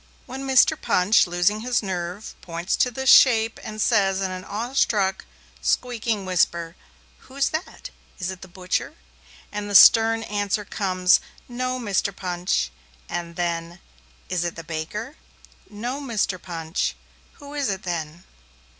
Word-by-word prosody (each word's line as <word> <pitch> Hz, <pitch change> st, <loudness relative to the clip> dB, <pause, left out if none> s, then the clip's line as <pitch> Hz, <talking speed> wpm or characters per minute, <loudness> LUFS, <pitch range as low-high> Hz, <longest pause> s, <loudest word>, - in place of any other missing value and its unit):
When 270 Hz, +1 st, -7 dB
Mr. 265 Hz, -2 st, +5 dB
Punch, 185 Hz, +2 st, +3 dB
losing 175 Hz, +4 st, +1 dB
his 240 Hz, 0 st, 0 dB
nerve, 185 Hz, +2 st, -5 dB
points 170 Hz, +1 st, -2 dB
to 250 Hz, -, +2 dB
this 265 Hz, +2 st, +2 dB
shape 225 Hz, -3 st, +5 dB
and 215 Hz, 0 st, -7 dB
says 195 Hz, -4 st, +2 dB
in 190 Hz, -1 st, -2 dB
an 185 Hz, 0 st, -6 dB
awestruck, 210 Hz, -3 st, 0 dB, 0.4 s
squeaking 225 Hz, -, -1 dB
whisper, 170 Hz, -2 st, 0 dB, 0.4 s
'Who's 275 Hz, +1 st, -2 dB
that? 355 Hz, +10 st, -6 dB, 0.3 s
Is 185 Hz, -1 st, -3 dB
it 185 Hz, -, -10 dB
the 190 Hz, -, -10 dB
butcher?' 185 Hz, -, -3 dB, 0.6 s
and 210 Hz, 0 st, -5 dB
the 205 Hz, -, -2 dB
stern 225 Hz, +2 st, +7 dB
answer 205 Hz, -1 st, -2 dB
comes, 185 Hz, -2 st, +2 dB, 0.3 s
'No, 255 Hz, +1 st, -3 dB
Mr. 200 Hz, -3 st, -1 dB
Punch!' 175 Hz, -, -1 dB, 0.4 s
And 170 Hz, -1 st, -5 dB
then, 170 Hz, 0 st, -3 dB, 0.5 s
'Is 180 Hz, -2 st, -1 dB
it 175 Hz, -, -3 dB
the 165 Hz, -, -8 dB
baker?' 170 Hz, -, -5 dB, 0.5 s
'No, 240 Hz, +7 st, -5 dB
Mr. 215 Hz, -8 st, -1 dB
Punch!' 165 Hz, -2 st, -3 dB, 0.4 s
'Who 285 Hz, -1 st, -12 dB
is 285 Hz, -5 st, -1 dB
it 195 Hz, -1 st, -3 dB
then?' 170 Hz, -2 st, -4 dB
200 Hz, 140 wpm, -23 LUFS, 175-230 Hz, 0.6 s, stern